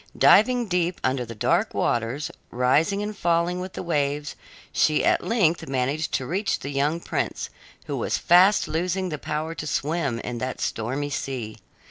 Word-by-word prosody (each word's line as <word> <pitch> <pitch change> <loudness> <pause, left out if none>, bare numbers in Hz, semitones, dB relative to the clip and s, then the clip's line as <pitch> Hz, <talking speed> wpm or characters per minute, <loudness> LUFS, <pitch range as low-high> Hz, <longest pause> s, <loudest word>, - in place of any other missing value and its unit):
Diving 245 +4 +5
deep 180 -2 0
under 130 -1 0
the 115 0 -8
dark 105 - +1
waters, 120 +5 -1 0.2
rising 145 +11 +2
and 210 0 -4
falling 170 -1 +1
with 185 +1 -6
the - - -5
waves, 150 -3 -1 0.4
she 155 -1 +3
at - - +3
length 175 -8 +1
managed 135 +4 -1
to 130 - 0
reach 195 +8 -1
the 140 - -6
young 145 +4 0
prince, - - -3 0.3
who - - -3
was - - -1
fast 185 +4 +5
losing 180 +3 -1
the 150 -3 -4
power 155 +3 -3
to 150 -1 -6
swim 145 -3 -1
in 120 -1 -5
that 130 +2 -4
stormy 135 +6 -2
sea. 125 -6 -4
155 Hz, 165 wpm, -24 LUFS, 135-180 Hz, 0.4 s, Diving